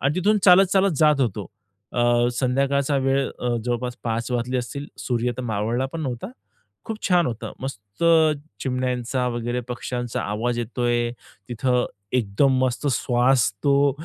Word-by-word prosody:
आणि 140 +3 +1
तिथून 210 +4 +3
चालत-चालत 190 +1 +6
जात 150 -1 +4
होतो. 105 -6 -1 0.5
अ, 120 0 +3
संध्याकाळचा 140 +3 +1
वेळ, 135 0 +1
अ, 125 - -2 0.2
जवळपास 125 0 -2
5:00 115 +1 -2
वाजले 125 +1 -1
असतील, 140 +4 -5
सूर्य 120 -1 -1
तर 130 - -4
मावळला 115 +3 -1
पण 165 - -4
नव्हता, 125 -4 -4 0.6
खूप 220 -1 -5
छान 175 -2 +4
होतं. 115 -2 -5
मस्त 105 -1 -6 0.6
चिमण्यांचा 125 -1 -1
वगैरे, 120 +1 -2
पक्ष्यांचा 120 0 -3
आवाज 115 +4 -2
येतोय 120 0 0 0.4
तिथं, 125 +1 +1 0.3
एकदम 125 +3 +2
मस्त 130 +3 -2
श्वास 125 0 +2
तो, 140 0 +4
125 Hz, 135 wpm, -23 LUFS, 120-140 Hz, 0.6 s, चालत-चालत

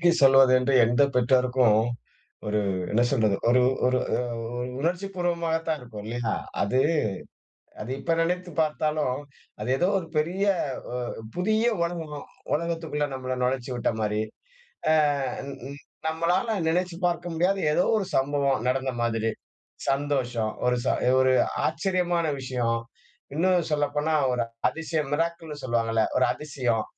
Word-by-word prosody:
விலக்கி 175 0 +5
சொல்வதென்று 135 -1 +6
எந்த 120 +4 +3
பெற்றோருக்கும், 125 -2 +3 0.7
ஒரு 105 0 +1 0.3
என்ன 120 +3 +3
சொல்றது? 110 -7 +2
ஒரு, 125 +1 +5 0.3
ஒரு 125 0 +2 0.2
அ - - -1 0.4
ஒரு 125 0 -2
உணர்ச்சி 180 +5 -1
பூர்வமாகத்தான் 165 -3 -1
இருக்கும். 110 -4 -9
இல்லையா? 115 -1 -2 0.3
அது 125 +6 +2 1.0
அது 120 +4 -5
இப்ப 165 - 0
நினைத்து 180 +2 -1
பார்த்தாலும், 150 -3 0 0.4
அது 110 - -3
ஏதோ 180 - +2
ஒரு 165 - -8
பெரிய 175 +6 0 0.5
ஒ - - -5 0.4
புதிய 215 +5 +1 0.2
உலகம். 165 -4 -4 0.3
உலகத்துக்குள்ள 165 -2 -1
நம்மள 130 -1 -3
நுழைச்சு 125 0 -1
விட்ட 120 - 0
மாரி. 105 0 0 0.7
அ - - +6 0.6
ன் 140 - -5 0.2
ன் 140 - -9 0.3
நம்மளால 175 +7 0
நினைச்சுப் 180 +1 -1
பார்க்க 175 0 -2
முடியாத, 185 +4 +2
ஏதோ 180 - +3
ஒரு 195 - -2
சம்பவம் 140 -3 +1
நடந்த 130 +1 0
மாதிரி. 115 -1 0 0.6
சந்தோஷம், 130 -6 0
ஒரு 125 - +3
ச - - 0 0.3
ஒரு 130 0 +4 0.3
ஆச்சரியமான 175 0 0
விஷயம்! 125 -3 -1 0.6
இன்னும் 180 +1 +2
சொல்லப்போனா 150 +1 0 0.2
ஒரு 125 -1 +1 0.3
அதிசயம். 160 -2 -3
மிராக்கிள் 165 +1 -2
ன்னு 145 -2 -7
சொல்வாங்கள்ல, 115 -2 +1 0.2
ஒரு 130 - +4
அதிசயம். 125 -6 -1
145 Hz, 130 wpm, -26 LUFS, 125-170 Hz, 1.0 s, சொல்வதென்று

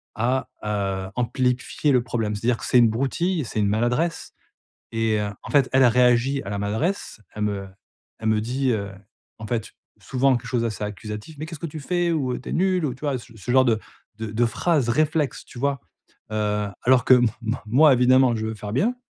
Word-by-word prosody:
à, 125 +3 0 0.2
heu, 95 -2 -2
amplifier 125 +3 0
le 125 - +4
problème. 110 -3 -2
C'est-à-dire 115 +3 0
que - - -7
c'est 125 - +4
une 115 -2 +6
broutille, 145 +7 -1
c'est 110 - -4
une 100 - +2
maladresse 120 +11 0 0.6
et 115 -1 +1
heu, 105 -1 -2
en - - -9
fait, 140 -3 +4
elle 130 0 +5
a 125 - +7
réagi 125 +3 +3
à - - -7
la 100 -1 -3
maladresse, 115 - -2 0.2
elle 105 - -2
me 100 -2 -2 0.5
elle 110 - -1
me 110 -1 +2
dit, 130 +4 -1
heu, 100 -3 -2 0.5
en 110 - -7
fait, 115 -2 -3 0.3
souvent 135 0 +2
quelque 120 - -10
chose 120 -2 0
assez 110 -2 -3
accusatif. 105 +7 -6
«Mais 155 - -4
qu'est-ce 160 -3 -8
que 170 - -4
tu 155 +1 -7
fais?» 175 +3 0
ou, 135 -6 0
heu, - - -4
«Tu - - -9
es - - -3
nul!» 185 -1 +1
ou, 130 - -2
tu - - -22
vois, 145 -4 -1
ce 115 0 -15
ce 115 +4 -4
genre 130 +1 +5
de 115 -3 +2 0.4
de 110 0 -4
de 115 +3 +1
phrase 140 +2 +1
réflexe, 150 +1 0
tu 120 - -11
vois? 140 -2 0 0.5
Heu, 105 -1 0 0.2
alors 125 -1 +4
que 130 - +8
m 120 -1 +4 0.2
m 115 +3 -1
moi 140 +6 +6
évidemment, 125 0 +4
je 110 0 -3
veux 110 - -3
faire 105 -1 -7
bien 225 - +1
120 Hz, 220 wpm, -23 LUFS, 110-135 Hz, 0.6 s, que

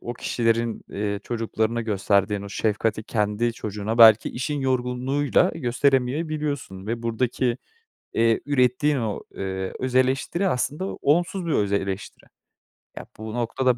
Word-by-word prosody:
o 120 - -5
kişilerin, 115 -1 0
eee, 100 0 -3
çocuklarına 115 0 -1
gösterdiğin 100 -1 +1
o 100 - -7
şefkati 110 +1 -1
kendi 105 +2 0
çocuğuna 105 +1 -4
belki 110 -1 +8
işin 145 +4 -3
yorgunluğuyla, 130 +2 +1
eee, - - -7
gösteremeyebiliyorsun 135 - -1
ve 115 +1 -3
buradaki, 120 +1 0 0.6
eee, 115 0 +2
ürettiğin 140 +1 +2
o, 110 -5 -2
eee, 95 -1 -4
özeleştiri 130 +8 +1
aslında 145 +7 -1
onsuz 175 +5 0
bir 165 - -1
özeleştiri. 100 -3 -2 0.7
Ya, - - -7
bu 110 0 -7
noktada 120 +1 0
120 Hz, 120 wpm, -24 LUFS, 110-130 Hz, 0.7 s, belki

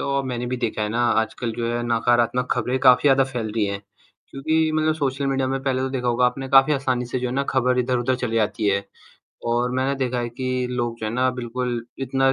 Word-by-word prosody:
और 140 -1 -1
मैंने 125 -1 -3
भी 125 +1 -2
देखा 115 -3 -2
है 105 - -1
ना, 115 +3 -1 0.2
आजकल 115 +1 -3
जो 115 - -2
है 120 0 -1
नकारात्मक 120 +1 +1
खबरें 130 +1 -1
काफ़ी 125 -1 +7
ज़्यादा 135 0 +5
फैल 120 -5 -4
रही 110 -1 +1
हैं। 100 0 -3 0.5
क्योंकि 155 +3 +1
मतलब 155 0 +2
सोशल 140 -2 -1
मीडिया 135 -1 0
में 135 0 -2
पहले 130 -1 0
तो 130 - -1
देखा 125 -2 -2
होगा 125 +1 +3
आपने 135 +2 -3
काफ़ी 135 +3 +6
आसानी 130 -3 0
से 125 +2 -2
जो 125 - -1
है 125 - -4
ना, 140 - +1
खबर 125 -1 +2
इधर-उधर 125 0 +1
चली 125 -3 -2
जाती 110 0 0
है 100 0 +1 0.6
और 120 +1 +1
मैंने 130 +2 0
देखा 125 0 -2
है 120 - -2
कि 130 +1 -2
लोग 120 -2 -2
जो 110 - -2
है 110 - -3
ना, 130 +2 +2
बिल्कुल 125 -1 -3
इतना 135 0 +1
125 Hz, 235 wpm, -23 LUFS, 120-135 Hz, 0.6 s, काफ़ी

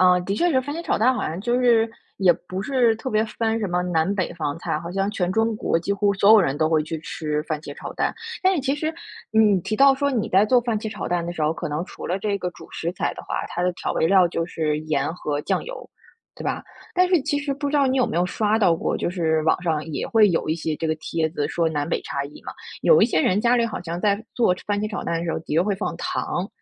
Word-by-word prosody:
啊， 180 -1 +6
的 195 +3 -2
确 350 +11 +2
是 260 -4 +3
番 285 +3 -5
茄 335 - -4
炒 - - 0
蛋 250 +4 +4
好 - - -2
像 165 +4 -4
就 240 +3 +1
是， 230 -2 +4 0.3
也 185 -3 +5
不 185 +3 -6
是 245 -4 +2
特 260 +3 -5
别 215 +1 +2
分 225 0 -1
什 210 - -1
么 180 0 0
南 175 +2 0
北 185 -3 -1
方 150 -3 -3
菜， 155 - -2
好 170 +2 -7
像 195 +1 0
全 180 -3 -1
中 225 0 +1
国 165 - 0
几 200 +4 -2
乎 200 0 +1
所 200 +2 +4
有 220 - +8
人 140 -5 0
都 155 0 +2
会 155 -1 +2
去 160 +1 -4
吃 150 -1 -3
番 155 -1 -3
茄 145 -2 -8
炒 - - -7
蛋。 - - 0 0.3
但 375 0 +4
是 305 - 0
其 275 +1 +1
实， 315 +2 -3 0.4
你 210 -4 +4
提 215 - -2
到 275 +3 +6
说， 280 +1 0
你 225 -4 -1
在 195 +3 +4
做 250 +2 +4
番 230 -3 -1
茄 220 - -4
炒 - - -5
蛋 175 -1 -1
的 175 - -3
时 160 - -4
候， 155 +1 +2
可 165 - -5
能 150 +4 -2
除 - - -9
了 185 +3 -1
这 200 0 -1
个 180 - -2
主 - - -13
食 170 +2 -3
材 - - -2
的 - - -9
话， - - -3
它 175 - -3
的 180 0 +1
调 - - -3
味 160 - +1
料 190 -1 +5
就 165 0 -2
是 155 -3 -1
盐 155 -1 -1
和 150 -4 -3
酱 - - -1
油， - - -9 0.5
对 - - -8
吧？ - - -2 0.3
但 365 0 +4
是 355 -5 +4
其 290 - 0
实 285 -1 -2
不 285 +1 -3
知 295 - 0
道 275 -2 +3
你 260 - +1
有 255 - +3
没 - - -3
有 175 - +3
刷 210 +3 +1
到 180 -6 +4
过？ - - -1
就 - - -2
是 160 -3 0
网 160 +3 +2
上 160 -4 -1
也 155 -3 -3
会 220 -2 +5
有 165 - -1
一 160 - +2
些 160 -2 -3
这 165 - -2
个 155 - +1
帖 160 0 -2
子 150 -3 -2
说 170 -1 +1
南 145 -2 -2
北 - - 0
差 140 0 -3
异 145 - -11
嘛， - - -6 0.3
有 480 - +6
一 - - +8
些 190 -9 +1
人 190 +5 +2
家 240 +1 +3
里 235 -1 +2
好 215 - -5
像 170 0 -4
在 205 +2 +1
做 225 -7 +3
番 205 -1 -1
茄 215 - -1
炒 205 - -4
蛋 170 0 -1
的 170 - -4
时 165 - -1
候， - - -3
的 160 - -5
确 165 - +4
会 205 +1 0
放 190 -3 -3
糖， 175 +2 -2
190 Hz, 315 characters per minute, -23 LUFS, 165-225 Hz, 0.5 s, 有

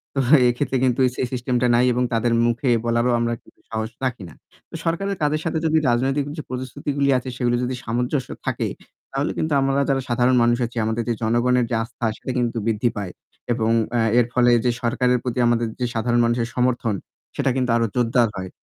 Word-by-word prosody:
তো - - +1 0.3
এইক্ষেত্রে 130 +2 0
কিন্তু 130 0 +1
এই 125 - +1
সেই 125 - -1
সিস্টেমটা 125 0 0
নাই 125 +1 +4
এবং 125 +1 +1
তাদের 115 +1 +1
মুখে 120 +2 0 0.2
বলারও 120 +1 +2
আমরা 120 0 0
কিন্তু - - -23
সাহস 110 0 -3
রাখি 120 -6 -3
না। - - -14 0.4
তো - - -9
সরকারের 195 +4 -1
কাজের 150 +1 +1
সাথে 165 0 -1
যদি 160 0 +3
রাজনৈতিক 135 +4 +1
যে 155 - -4
প্রতিশ্রুতিগুলি 140 +2 -2
আছে, 130 +1 -5
সেগুলি 120 -1 +1
যদি 125 +1 -2
সামঞ্জস্য 125 +4 -2 0.2
থাকে, - - -1 0.4
তাহলে 140 +3 -1
কিন্তু 155 -1 -1
আমরা 135 0 +1 0.2
যারা 135 -1 +1
সাধারণ 125 +2 +3
মানুষ 120 0 +3
আছি, 120 +1 -9
আমাদের 110 +1 -1
যে - - +2
জনগণের 120 +2 +2
যে 120 - 0
আস্থা, 115 0 -6
সেটা 130 - -5
কিন্তু 120 -1 0
বৃদ্ধি 115 +2 +1
পায়। 95 -3 -4 0.4
এবং 115 -1 0 0.3
আ - - +2 0.2
এর 120 - +4
ফলে 120 -1 +4
যে 120 - +4
সরকারের 125 +1 +2
প্রতি 125 0 -2
আমাদের 120 -1 +1
যে 125 - 0
সাধারণ 120 +1 +1
মানুষের 120 0 0
সমর্থন, 125 -4 +1 0.4
সেটা 140 -1 +1
কিন্তু 125 -2 0
আরো 115 - +2
জোরদার 120 -1 +3
হয়। 95 -1 -5
125 Hz, 200 wpm, -22 LUFS, 120-130 Hz, 0.4 s, নাই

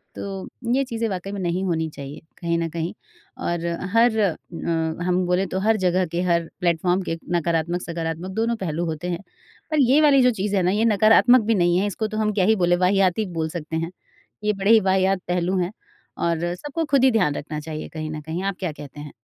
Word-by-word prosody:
तो 195 -1 -6 0.3
ये 275 +2 +3
चीज़ें 230 -2 -2
वाक़ई 190 +1 -4
में 200 - -5
नहीं 180 +1 -1
होनी 160 -2 -1
चाहिए 140 -1 -9 0.2
कहीं 170 -1 -1
न 165 - -1
कहीं 165 +1 -3 0.5
और 170 0 -2 0.3
हर 230 -1 +4
अ, 195 -6 +3 0.7
हम 180 0 +1
बोलें 180 +2 +1
तो 190 - -2
हर 220 +2 +2
जगह 185 -1 +2
के 170 +2 -2
हर 170 -2 +1
प्लेटफॉर्म 175 +2 +1
के 165 - -2 0.2
नकारात्मक, 170 +1 0
सकारात्मक 170 +2 -4
दोनों 230 +3 0
पहलू 175 -4 -3
होते 160 +2 -4
हैं। 170 - -2 0.5
पर 310 - +2
ये 280 +4 +6
वाली 280 -3 +6
जो 250 - +5
चीज़ 205 0 0
है 190 - +3
ना 180 - +2
ये 215 +3 +2
नकारात्मक 225 +3 +6
भी 225 0 +2
नहीं 175 -1 +3
है, 205 - +1
इसको 215 +2 -2
तो 215 0 -5
हम 215 -1 +1
क्या 190 -3 +2
ही 220 +2 +4
बोले 175 -2 +3
वाहियात 190 0 +3
बोल 160 -1 -1
सकते 160 -1 -5
हैं। 165 +1 -2 0.5
ये 210 - +2
बड़े 195 +2 +1
ही 225 - +8
वाहियात 190 -1 +2
पहलू 180 +1 0
हैं 180 +2 -1 0.5
और 170 +1 0
सबको 295 - -3
खुद 280 -3 +2
ही 265 - +6
ध्यान 180 -11 +2
रखना 150 +1 -5
चाहिए 155 0 -6
कहीं 155 -1 -5
न 155 -1 -5
कहीं 160 +5 -4
आप 195 -1 -2
क्या 180 -5 -2
कहते 145 -1 -11
हैं? 145 -1 -9
180 Hz, 220 wpm, -23 LUFS, 170-210 Hz, 0.7 s, ही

